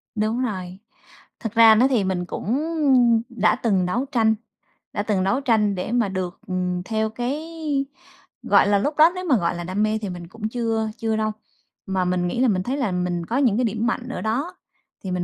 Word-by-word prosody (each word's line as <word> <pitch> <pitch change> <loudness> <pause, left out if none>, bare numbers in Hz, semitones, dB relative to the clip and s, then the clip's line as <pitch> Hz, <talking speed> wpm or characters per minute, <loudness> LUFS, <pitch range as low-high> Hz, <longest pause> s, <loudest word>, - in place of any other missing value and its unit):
Đúng 215 +3 0
rồi, 185 -5 -4 0.6
thực 225 -1 -5
ra 225 -1 +7
đó 245 +4 +5
thì 235 -7 +2
mình 185 -2 -1
cũng 205 +5 -3 0.8
đã 235 -4 +2
từng 190 -5 +2
đấu 240 +9 -1
tranh, 220 -2 +3 0.6
đã 205 - -1
từng 205 -3 0
đấu 250 +8 +1
tranh 215 -6 +2
để 180 +4 -4
mà 235 -4 +1
được, 185 -1 -4
ừm, 180 -1 -2
theo 220 0 -1
cái, 245 +6 -3 1.0
gọi - - +4
là, 205 -1 +3
lúc 290 +8 -2
đó 315 +2 +7
nếu 365 0 -5
mà, 280 -8 +3
gọi 175 - -1
là, 175 - -5
đam 185 +4 -1
mê 215 0 0
thì 205 - -4
mình 175 -1 -7
cũng 215 +3 -5
chưa 225 -2 -1
chưa 225 -1 -1
đâu. 215 0 0 0.5
Mà 190 -1 -1
mình 180 0 0
nghĩ 205 - -3
là 260 - +4
mình 185 -5 +1
thấy 265 +6 -2
là 240 -9 -1
mình 180 -1 -2
có 235 - -2
những 245 -7 +3
cái 250 - +1
điểm 225 +1 -1
mạnh 245 +1 -2
ở 255 - -4
đó, 275 +12 -2 0.5
thì 190 - -4
mình 180 -1 -1
215 Hz, 215 wpm, -23 LUFS, 185-235 Hz, 1.0 s, ra